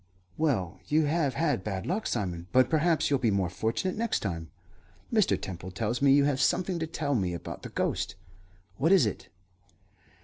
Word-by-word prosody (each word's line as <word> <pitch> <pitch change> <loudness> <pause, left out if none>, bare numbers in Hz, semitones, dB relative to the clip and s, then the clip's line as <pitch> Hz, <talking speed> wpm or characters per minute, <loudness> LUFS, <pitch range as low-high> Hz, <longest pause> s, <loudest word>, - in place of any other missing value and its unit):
"Well, 120 - 0
you 155 +1 +3
have 145 -4 0
had 150 - 0
bad 95 -2 -3
luck, 200 +6 -1
Simon; 90 -6 -3
but 130 +2 +4
perhaps 160 -1 +2
you'll 140 - +3
be 120 - +2
more 95 -3 0
fortunate 115 - -1
next 230 +1 -1
time. 85 -5 -4 0.6
Mr. - - +3
Temple 90 -1 -6
tells 115 +6 -2
me 140 -1 +5
you 140 +1 +6
have 140 -2 +1
something 180 -1 +1
to 160 - -2
tell 150 -3 -2
me 95 -8 0
about 85 - -7
the - - -7
ghost. - - -2 0.6
What 160 +7 +2
is 190 -10 +6
it?" 105 - -4
130 Hz, 180 wpm, -28 LUFS, 95-160 Hz, 0.6 s, you